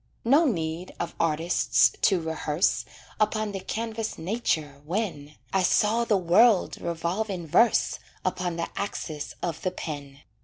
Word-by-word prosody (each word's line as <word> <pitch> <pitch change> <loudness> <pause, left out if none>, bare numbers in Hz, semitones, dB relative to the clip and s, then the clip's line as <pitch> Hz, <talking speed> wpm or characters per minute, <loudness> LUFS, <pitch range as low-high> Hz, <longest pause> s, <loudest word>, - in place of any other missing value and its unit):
No 285 +8 +5
need 170 - -2
of 170 -1 -3
artists 165 +1 +3
to 190 -3 +4
rehearse 160 0 0 0.3
Upon 215 0 +1
the 195 - -4
canvas 225 +3 -4
nature, 160 -7 -2
when 155 -4 -3 0.2
I 190 - +3
saw 215 +5 +3
the 215 -3 +3
world 190 +4 +4
revolve 170 +6 -2
in 180 -4 -4
verse 185 +9 +3 0.3
Upon 180 -2 -1
the 170 0 -3
axis 155 -7 -4
of 165 -2 -3
the 185 - 0
pen. 145 -6 -7
180 Hz, 140 wpm, -26 LUFS, 160-215 Hz, 0.3 s, No